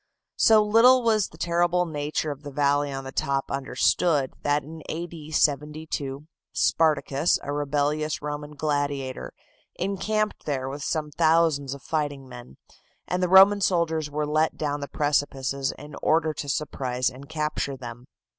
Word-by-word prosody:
So 220 Hz, -1 st, +6 dB
little 235 Hz, +4 st, +5 dB
was 215 Hz, -3 st, +2 dB
the 160 Hz, -, -17 dB
terrible 175 Hz, +1 st, +1 dB
nature 150 Hz, -1 st, -2 dB
of 145 Hz, 0 st, -8 dB
the 145 Hz, -, -8 dB
valley 145 Hz, 0 st, +1 dB
on 135 Hz, 0 st, -5 dB
the 135 Hz, -, -7 dB
top 135 Hz, 0 st, -1 dB
understood, 140 Hz, +2 st, +1 dB
that 145 Hz, 0 st, +1 dB
in 160 Hz, +3 st, -10 dB
A. 170 Hz, +2 st, -3 dB
D. 160 Hz, -3 st, -10 dB
72, 150 Hz, -2 st, -1 dB, 0.3 s
Spartacus, 155 Hz, -1 st, +2 dB
a 145 Hz, -, -3 dB
rebellious 145 Hz, +1 st, -1 dB
Roman 150 Hz, 0 st, -6 dB
gladiator, 145 Hz, -3 st, -2 dB, 0.4 s
encamped 210 Hz, +3 st, -2 dB
there 135 Hz, -3 st, -1 dB
with 140 Hz, +2 st, -6 dB
some 150 Hz, +1 st, -2 dB
thousands 155 Hz, -4 st, +2 dB
of 140 Hz, -, -14 dB
fighting 145 Hz, -4 st, -2 dB
men, 120 Hz, -, -12 dB, 0.5 s
and 180 Hz, 0 st, -1 dB
the 180 Hz, -, +1 dB
Roman 195 Hz, +2 st, +7 dB
soldiers 165 Hz, -5 st, +1 dB
were 150 Hz, +1 st, -2 dB
let 155 Hz, +2 st, +1 dB
down 145 Hz, -1 st, -2 dB
the 140 Hz, -, -5 dB
precipices 140 Hz, -2 st, -1 dB
in 150 Hz, 0 st, -12 dB
order 160 Hz, 0 st, +2 dB
to 145 Hz, -1 st, -6 dB
surprise 130 Hz, -3 st, -2 dB
and 135 Hz, +3 st, -6 dB
capture 150 Hz, -3 st, -2 dB
them. 120 Hz, -1 st, -9 dB
150 Hz, 155 wpm, -25 LUFS, 140-160 Hz, 0.5 s, Roman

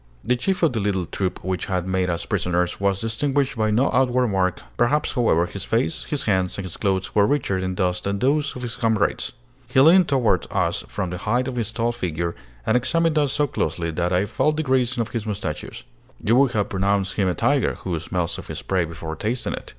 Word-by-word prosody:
The 125 Hz, +2 st, +2 dB
chief 185 Hz, +9 st, -1 dB
of 160 Hz, -, +4 dB
the 115 Hz, -, -1 dB
little 100 Hz, -3 st, 0 dB
troop 95 Hz, +2 st, -3 dB
which 95 Hz, -1 st, -2 dB
had 90 Hz, -2 st, -1 dB
made 95 Hz, -1 st, 0 dB
us 85 Hz, -1 st, -2 dB
prisoners 90 Hz, 0 st, 0 dB
was 100 Hz, -1 st, +1 dB
distinguished 135 Hz, +5 st, 0 dB
by 110 Hz, -2 st, +1 dB
no 115 Hz, +6 st, +2 dB
outward 125 Hz, -1 st, +3 dB
mark. 95 Hz, -2 st, 0 dB
Perhaps, 145 Hz, +5 st, +2 dB
however, 110 Hz, -, +3 dB
his -, -, -6 dB
face, 80 Hz, -, -1 dB
his 145 Hz, -3 st, -2 dB
hands, 95 Hz, -3 st, 0 dB
and 100 Hz, -, -4 dB
his 90 Hz, -, -7 dB
clothes 95 Hz, -2 st, -1 dB
were 105 Hz, -1 st, +4 dB
richer 120 Hz, -9 st, 0 dB
in 95 Hz, 0 st, -2 dB
dust 90 Hz, -2 st, -1 dB
than 100 Hz, 0 st, 0 dB
those 140 Hz, +6 st, +1 dB
of 125 Hz, -, -6 dB
his 120 Hz, -1 st, -4 dB
comrades. 110 Hz, -3 st, +1 dB, 0.4 s
He 130 Hz, -, +3 dB
leaned 170 Hz, +6 st, +7 dB
toward 120 Hz, -, +2 dB
us -, -, 0 dB
from 95 Hz, -3 st, -3 dB
the 90 Hz, -, -4 dB
height 120 Hz, +6 st, 0 dB
of 130 Hz, -, -4 dB
his 115 Hz, -2 st, -2 dB
tall 115 Hz, +1 st, 0 dB
figure, 85 Hz, -6 st, -3 dB, 0.3 s
and -, -, +2 dB
examined 165 Hz, +5 st, +2 dB
us 145 Hz, -3 st, +1 dB
so 150 Hz, -, +2 dB
closely 85 Hz, -, -2 dB
that 85 Hz, +2 st, -1 dB
I 90 Hz, +2 st, +2 dB
felt 150 Hz, +8 st, 0 dB
the 155 Hz, -, 0 dB
grazing 125 Hz, -3 st, +1 dB
of 115 Hz, -, -3 dB
his 115 Hz, -2 st, -4 dB
moustachios. 100 Hz, -7 st, -4 dB, 0.4 s
You 115 Hz, -, +2 dB
would 135 Hz, -1 st, +4 dB
have 105 Hz, -2 st, 0 dB
pronounced 95 Hz, 0 st, 0 dB
him 100 Hz, -2 st, +1 dB
a 90 Hz, -, 0 dB
tiger, -, -, +2 dB
who 85 Hz, -4 st, -2 dB
smells 85 Hz, +1 st, -2 dB
of -, -, -10 dB
his -, -, -6 dB
prey 95 Hz, -3 st, +1 dB
before 80 Hz, -1 st, -6 dB
tasting 115 Hz, +8 st, -2 dB
it. -, -, -7 dB
105 Hz, 225 wpm, -23 LUFS, 95-125 Hz, 0.4 s, leaned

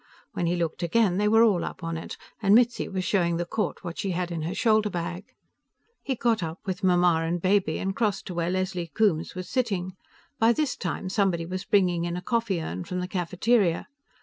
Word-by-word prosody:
When 175 Hz, -, -1 dB
he 175 Hz, -, +1 dB
looked 170 Hz, -2 st, -2 dB
again, 180 Hz, +2 st, +2 dB
they 210 Hz, -, +2 dB
were 225 Hz, +2 st, +6 dB
all 200 Hz, -7 st, +3 dB
up 185 Hz, -, -6 dB
on 165 Hz, 0 st, -3 dB
it, 165 Hz, -, -6 dB, 0.2 s
and 200 Hz, 0 st, +5 dB
Mitzi 240 Hz, 0 st, +3 dB
was 190 Hz, -1 st, -2 dB
showing 170 Hz, -4 st, +1 dB
the 175 Hz, -, -2 dB
court 210 Hz, +4 st, -3 dB
what 170 Hz, -2 st, -6 dB
she 195 Hz, -, -1 dB
had 180 Hz, -1 st, -2 dB
in 165 Hz, -2 st, -3 dB
her 165 Hz, +4 st, -3 dB
shoulder 215 Hz, -2 st, +3 dB
bag. 175 Hz, +1 st, -4 dB, 0.8 s
He 265 Hz, -, -2 dB
got 230 Hz, -3 st, +1 dB
up, 165 Hz, 0 st, -4 dB
with 190 Hz, +1 st, -4 dB
Mamma 175 Hz, -2 st, +4 dB
and 170 Hz, +2 st, -1 dB
Baby, 185 Hz, -3 st, +2 dB
and 195 Hz, 0 st, -2 dB
crossed 210 Hz, -4 st, 0 dB
to 180 Hz, -, -6 dB
where 170 Hz, 0 st, -1 dB
Leslie 185 Hz, -1 st, -2 dB
Coombes 185 Hz, -8 st, +1 dB
was 185 Hz, -1 st, -5 dB
sitting. 195 Hz, -8 st, -1 dB, 0.5 s
By 225 Hz, +1 st, +5 dB
this 300 Hz, 0 st, -1 dB
time, 180 Hz, 0 st, -4 dB
somebody 185 Hz, -4 st, +1 dB
was 185 Hz, +2 st, -5 dB
bringing 180 Hz, -4 st, +2 dB
in 175 Hz, 0 st, -2 dB
a -, -, -4 dB
coffee 230 Hz, -4 st, 0 dB
urn 90 Hz, -, -4 dB
from 180 Hz, -, -4 dB
the 180 Hz, -, -3 dB
cafeteria. 185 Hz, +1 st, +1 dB
185 Hz, 215 wpm, -26 LUFS, 170-210 Hz, 0.8 s, were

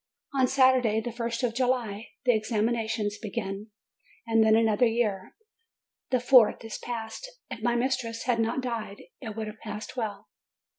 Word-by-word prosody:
On 260 Hz, -2 st, +3 dB
Sat 260 Hz, 0 st, +5 dB
urday, 225 Hz, -4 st, +1 dB
the 240 Hz, -, -3 dB
first 235 Hz, +1 st, -3 dB
of 240 Hz, -2 st, +1 dB
July, 240 Hz, -4 st, -1 dB, 0.2 s
the 245 Hz, -, +5 dB
examinations 220 Hz, -1 st, -1 dB
begin. 210 Hz, -2 st, -4 dB, 0.6 s
And 225 Hz, -1 st, +4 dB
then 220 Hz, 0 st, +5 dB
another 225 Hz, +1 st, +4 dB
year, 215 Hz, -5 st, -1 dB, 0.7 s
the 255 Hz, -, +2 dB
fourth, 245 Hz, -3 st, +5 dB
is 225 Hz, -, -6 dB
past! 235 Hz, -, -6 dB, 0.2 s
If -, -, -6 dB
my 240 Hz, +1 st, +1 dB
mis 260 Hz, +2 st, +1 dB
tress 230 Hz, -2 st, -5 dB
had 240 Hz, -2 st, +1 dB
not 225 Hz, +4 st, 0 dB
died, 230 Hz, -5 st, -4 dB, 0.2 s
it 220 Hz, -2 st, -6 dB
would 220 Hz, -1 st, -3 dB
have 215 Hz, -, -8 dB
passed 210 Hz, +3 st, -7 dB
well. 210 Hz, -4 st, -4 dB
230 Hz, 165 wpm, -28 LUFS, 215-245 Hz, 0.7 s, Sat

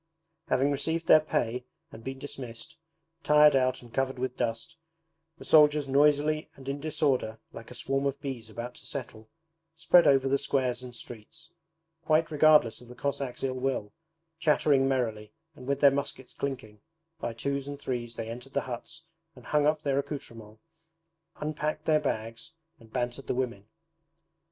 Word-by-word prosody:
Having 135 Hz, +3 st, +2 dB
received 160 Hz, +4 st, -1 dB
their 155 Hz, -, +8 dB
pay 125 Hz, -5 st, -1 dB, 0.3 s
and 115 Hz, -5 st, -11 dB
been 135 Hz, +1 st, -5 dB
dismissed, 130 Hz, +1 st, -6 dB, 0.5 s
tired 150 Hz, -1 st, +6 dB
out 130 Hz, -1 st, +1 dB
and 120 Hz, -1 st, -15 dB
covered 135 Hz, 0 st, 0 dB
with 125 Hz, 0 st, -3 dB
dust, 120 Hz, +8 st, -3 dB, 0.6 s
the -, -, -10 dB
soldiers 150 Hz, -2 st, +5 dB
noisily 150 Hz, +2 st, +3 dB
and 135 Hz, -1 st, -13 dB
in 140 Hz, +1 st, -2 dB
disorder, 140 Hz, -7 st, 0 dB, 0.2 s
like 115 Hz, -, -10 dB
a 125 Hz, -, -9 dB
swarm 135 Hz, +2 st, 0 dB
of 140 Hz, 0 st, -3 dB
bees 130 Hz, -6 st, -5 dB
about 120 Hz, +3 st, -6 dB
to -, -, -12 dB
settle, 110 Hz, -5 st, -6 dB, 0.5 s
spread 165 Hz, 0 st, +5 dB
over 135 Hz, -1 st, +4 dB
the 135 Hz, +1 st, +2 dB
squares 130 Hz, -3 st, 0 dB
and 125 Hz, -1 st, -9 dB
streets; 160 Hz, +9 st, -10 dB, 0.5 s
quite 160 Hz, 0 st, +2 dB
regardless 150 Hz, -7 st, +5 dB
of 125 Hz, -, -14 dB
the 125 Hz, -, -11 dB
Cossacks' 135 Hz, 0 st, -3 dB
ill 130 Hz, -1 st, 0 dB
will, 125 Hz, -6 st, -2 dB, 0.5 s
chattering 150 Hz, -4 st, +3 dB
merrily 115 Hz, -5 st, -1 dB, 0.2 s
and 125 Hz, -1 st, -12 dB
with 140 Hz, 0 st, 0 dB
their 140 Hz, -1 st, +8 dB
muskets 135 Hz, -2 st, -4 dB
clinking, 125 Hz, -7 st, -5 dB, 0.4 s
by 120 Hz, -, -3 dB
twos 140 Hz, +4 st, -3 dB
and 145 Hz, 0 st, -6 dB
threes 120 Hz, -3 st, -4 dB
they 115 Hz, -, -5 dB
entered 125 Hz, +4 st, -8 dB
the -, -, +1 dB
huts 130 Hz, +6 st, -7 dB, 0.3 s
and 125 Hz, -2 st, -15 dB
hung 150 Hz, +1 st, +2 dB
up 155 Hz, 0 st, +1 dB
their 140 Hz, -1 st, +1 dB
accoutrements, 115 Hz, -7 st, -7 dB, 0.7 s
unpacked 155 Hz, 0 st, -3 dB
their 155 Hz, -1 st, +4 dB
bags, 115 Hz, -2 st, -4 dB, 0.3 s
and 110 Hz, -2 st, -18 dB
bantered 125 Hz, +2 st, -3 dB
the -, -, -1 dB
women. 120 Hz, -6 st, -3 dB
135 Hz, 165 wpm, -29 LUFS, 120-150 Hz, 0.7 s, their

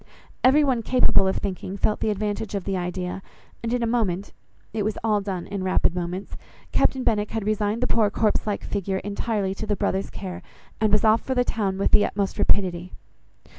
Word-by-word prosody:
Every 280 Hz, +4 st, +6 dB
one 260 Hz, -5 st, +1 dB
capable 250 Hz, -4 st, +4 dB
of 190 Hz, -, 0 dB
thinking 195 Hz, 0 st, -4 dB
felt 210 Hz, +2 st, +1 dB
the -, -, 0 dB
advantage 210 Hz, 0 st, -2 dB
of 195 Hz, -, -2 dB
the 195 Hz, 0 st, -2 dB
idea, 180 Hz, +1 st, -3 dB, 0.4 s
and 230 Hz, -, -2 dB
in 245 Hz, -1 st, 0 dB
a -, -, +2 dB
moment 205 Hz, -5 st, -1 dB, 0.4 s
(it 220 Hz, -, -1 dB
was 215 Hz, +1 st, -1 dB
all 210 Hz, -2 st, +2 dB
done 190 Hz, -3 st, -4 dB
in 200 Hz, -1 st, -4 dB
rapid 185 Hz, -2 st, +2 dB
moments) 180 Hz, +2 st, -4 dB, 0.4 s
Captain 260 Hz, -1 st, +2 dB
Benwick 210 Hz, -3 st, +1 dB
had 220 Hz, -3 st, -3 dB
resigned 215 Hz, +1 st, 0 dB
the -, -, +3 dB
poor 220 Hz, -4 st, +3 dB
corpse 215 Hz, +1 st, +1 dB
like 205 Hz, -, -2 dB
figure 195 Hz, -1 st, -2 dB
entirely 200 Hz, 0 st, -2 dB
to 215 Hz, +2 st, -6 dB
the 210 Hz, -, +1 dB
brother's 195 Hz, 0 st, -1 dB
care, 185 Hz, -2 st, -7 dB, 0.4 s
and 215 Hz, -1 st, +2 dB
was 210 Hz, -, +3 dB
off 220 Hz, +1 st, +5 dB
for 260 Hz, -, -2 dB
the 250 Hz, -, +3 dB
town 200 Hz, -5 st, -1 dB
with 195 Hz, -, +1 dB
the 205 Hz, -, +6 dB
utmost 200 Hz, 0 st, -2 dB
rapidity. 180 Hz, -3 st, +1 dB
205 Hz, 205 wpm, -24 LUFS, 190-220 Hz, 0.4 s, Every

